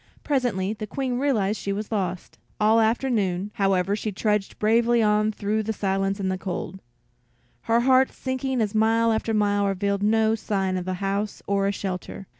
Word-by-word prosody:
Presently 235 -9 0
the 215 -1 -6
Queen 255 +1 -2
realized 220 -7 +1
that - - -9
she 200 - -2
was 205 +2 -4
lost. 185 -4 -3 0.2
All 220 +1 +4
afternoon, 220 -5 0
however, 195 0 +1
she 215 0 -3
trudged 210 0 -1
bravely 230 +2 +3
on 210 0 +2
through 215 +1 -1
the 220 +1 -2
silence 195 0 -1
and 190 -1 -1
the 185 - -3
cold, 190 0 -5 0.9
her 230 +1 +4
heart 260 +1 +4
sinking 260 -1 -2
as 210 -2 -1
mile 225 +1 +3
after 220 0 -1
mile 205 -1 +2
revealed 200 +1 -1
no 220 +1 +3
sign 195 -4 -1
of 180 0 -4
a 185 - -1
house 200 +1 -2
or 200 0 +1
a - - +1
shelter. 190 -1 -5
210 Hz, 180 wpm, -24 LUFS, 195-225 Hz, 0.9 s, All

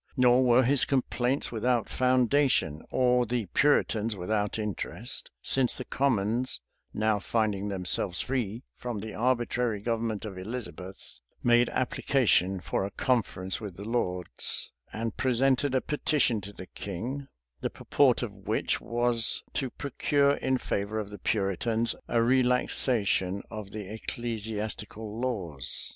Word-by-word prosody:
Nor 125 0 +5
were 125 +1 +5
his 135 +2 +5
complaints 130 0 0
without 120 0 +1
foundation, 130 - +2
or 125 -1 +3
the 120 -1 -1
Puritans 115 - +2
without 105 +3 -1
interest; 110 +3 -4
since 130 -3 +2
the 130 - -6
commons, 120 -2 0 0.3
now 110 -1 +1
finding 105 -2 0
themselves 95 -1 0
free 120 -3 -2
from 120 -3 -5
the 110 0 -6
arbitrary 120 -2 0
government 115 -1 -2
of 95 -3 -6
Elizabeth, 95 - -7 0.2
made 120 0 +5
application 115 -7 +2
for 90 - -2
a 100 - -2
conference 100 -5 -1
with 100 -5 -7
the 100 - -7
lords, 90 -7 -1 0.2
and 115 0 -4
presented 130 +1 +2
a 130 - +3
petition 145 -6 +1
to 100 +1 -8
the 95 - -9
king; 120 +11 -5 0.3
the - - -2
purport - - +2
of - - -3
both - - -18
which - - 0
was, 120 -1 +2
to 135 - -1
procure 140 +2 +1
in 130 0 +1
favor 100 -2 -2
of 105 -2 -4
the 105 - -8
Puritans, 110 +4 0
a 115 -1 +2
relaxation 120 -6 +2
of 105 -2 -6
the 105 -2 -7
ecclesiastical 110 -1 -4
laws. 95 - -1
115 Hz, 135 wpm, -28 LUFS, 100-125 Hz, 0.3 s, Nor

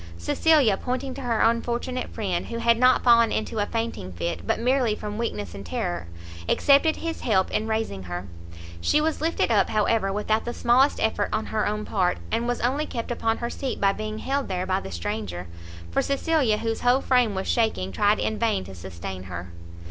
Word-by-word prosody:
Cecilia, 240 - +3
pointing 255 +3 -3
to 275 - -7
her 235 -3 0
unfortunate 240 +2 0
friend, 185 -5 -2
who 230 - -4
had 230 0 +3
not 255 +1 +5
fallen 235 -2 +5
into 220 0 -2
a 205 - 0
fainting 225 - -3
fit, 85 0 -4
but - - +2
merely 245 -2 +2
from 210 0 -6
weakness 105 - -3
and 100 - -8
terror, 85 -1 -3 0.4
accepted 285 +3 +4
his 330 -1 -4
help 190 -5 +2
in 220 - -1
raising 220 - -2
her. 90 +1 -5 0.5
She 300 - +3
was 310 0 -1
lifted 325 -6 +1
up, 210 - +3
however, 215 -1 +1
without 215 +2 0
the 240 - -4
smallest 255 +4 +3
effort 220 - 0
on 215 +1 -1
her 215 - -1
own 210 +1 -2
part, 185 -4 +1
and 230 +1 0
was 245 0 -1
only 275 +5 0
kept 230 0 -4
upon 225 -1 0
her 235 - -3
seat 270 - -4
by 195 0 +3
being 215 +1 -5
held 275 +4 -2
there 185 -1 -2
by 185 0 +1
the - - -8
stranger, 90 0 -4 0.5
for - - +2
Cecilia, 275 -5 +1
whose 225 +1 -2
whole 250 +2 +3
frame 250 -7 +2
was 190 - -3
shaking, 220 - 0
tried 205 - +3
in 220 - -2
vain 225 - +1
to 95 +1 -10
sustain 90 +1 -7
her. 90 -1 -7
220 Hz, 200 wpm, -25 LUFS, 180-245 Hz, 0.5 s, not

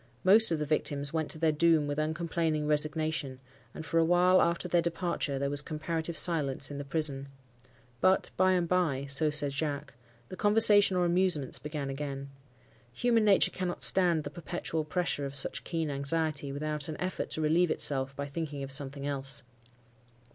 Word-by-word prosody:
Most 215 +4 +7
of 165 - +1
the 150 - -3
victims 145 -1 -1
went 160 -2 -2
to - - 0
their 160 0 +1
doom 160 0 +2
with 145 +1 -3
uncomplaining 160 0 -2
resignation, 150 -2 -1 0.3
and 160 - -9
for 165 - 0
a - - +4
while 180 +2 +3
after 170 +1 0
their 175 0 +2
departure 170 -4 -2
there 140 +1 -2
was 145 0 +2
comparative 160 +2 -4
silence 145 -5 +1
in 140 - -6
the - - -5
prison. 140 -2 -2 0.7
But, 190 +6 +2
by 185 0 +3
and 175 -2 0
by—so 150 -4 0
said 145 -1 +3
Jacques—the 140 -2 -7
conversation 205 -2 +5
or 180 - +1
amusements 175 -6 +2
began 150 -2 -5
again. 140 0 -6 0.6
Human 230 - +1
nature 200 -2 +4
cannot 180 -1 -4
stand 175 -4 +4
the 145 - -7
perpetual 165 -1 -5
pressure 150 -4 -2
of 140 - -4
such 135 - 0
keen 165 -3 -3
anxiety, 145 0 -1
without 150 +1 -4
an 155 - -6
effort 185 +1 -4
to 160 - -4
relieve 165 +3 +2
itself 135 -3 -2
by 140 - -5
thinking 145 -1 -6
of 135 - -6
something 140 0 -3
else. 140 0 -3
155 Hz, 170 wpm, -29 LUFS, 140-170 Hz, 0.7 s, Most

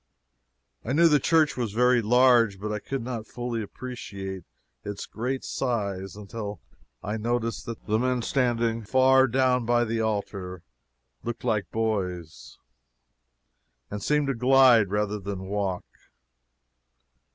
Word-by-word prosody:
I 125 - -2
knew 165 +3 +6
the 150 -2 +4
church 155 0 +3
was 120 -5 -3
very 125 +1 +4
large, 120 -3 +4
but 105 +2 -4
I 105 - -2
could 135 +3 -4
not 115 -3 -5
fully 120 -2 -4
appreciate 100 -5 -7 0.4
its 105 -1 -5
great 130 +4 -4
size 100 -7 -3
until 105 0 -6 0.4
I 105 +2 -3
noticed 115 +1 -2
that 115 -1 -7
the 110 +1 +1
men 125 -1 0
standing 120 -3 0
far 130 +4 +4
down 125 0 +2
by 120 +1 +2
the 115 0 -1
altar 100 -5 -3 0.6
looked 120 -1 -5
like 105 -5 0
boys, 90 -7 -3 1.3
and 105 0 -4
seemed 150 +3 +1
to 135 - 0
glide, 125 -4 +5
rather 105 +1 -1
than 95 -1 -5
walk. 95 -2 -2
115 Hz, 130 wpm, -26 LUFS, 105-125 Hz, 1.3 s, knew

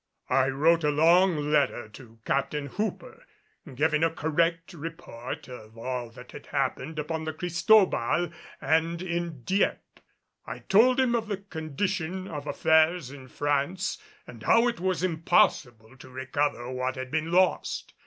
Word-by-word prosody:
I 130 0 +3
wrote 160 +5 +3
a 150 - +3
long 170 +5 +4 0.2
letter 140 -6 +1
to 115 +1 -14
Captain 140 +2 -1
Hooper, 210 - -5 0.5
giving 150 +3 +1
a 165 - +4
correct 165 +2 -1
report 155 -7 -7
of 115 -3 -11
all 125 0 -4
that 125 +2 -13
had - - -11
happened 135 +3 -2
upon 155 +1 -3
the 155 - -3
Cristobal 175 - +2 0.3
and 165 +2 +1
in 170 -6 -4
Dieppe. 195 - -1 0.5
I - - -5
told 245 +6 +4
him 255 -2 +2
of 230 -2 -1
the 205 -2 -2
condition 185 +1 -4
of 150 -3 -6
affairs 160 -3 +2
in 135 -2 -11
France 145 +7 -1 0.3
and - - -12
how 230 +2 +4
it 240 -1 -2
was 185 -1 -1
impossible 130 -8 +1
to 130 - -13
recover 130 -1 -2
what 130 0 -2
had 130 0 -6
been 160 +1 -1
lost. 185 +1 +1
160 Hz, 145 wpm, -27 LUFS, 130-175 Hz, 0.5 s, long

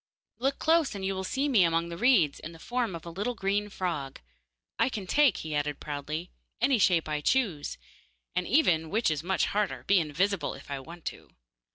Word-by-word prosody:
'Look 270 +3 0
close, 320 -6 +2
and 195 -1 -4
you 195 - 0
will 190 0 -3
see 270 +9 -1
me 235 -10 +5
among 165 0 +1
the 170 - -5
reeds 210 - +4
in 165 - -8
the - - -12
form 240 +1 -2
of 165 - -9
a 170 - -6
little 205 +8 -2
green 205 0 0
frog. 165 -9 -3 0.6
I - - +3
can 210 -6 -5
take,' 285 +3 +4
he 155 - -4
added 145 -1 -1
proudly, 150 +4 -5 0.3
'any 250 +1 +3
shape 175 -4 +3
I 150 -1 -2
choose, 190 - 0 0.6
and 180 -1 0
even, 170 - +3
which 215 -2 +2
is 150 -1 -1
much 190 +2 +1
harder, 210 -1 -1
be 200 -1 +5
invisible 170 +2 0
if - - -12
I 140 - -2
want 170 +5 -11
to. - - -19
185 Hz, 205 wpm, -29 LUFS, 160-225 Hz, 0.6 s, me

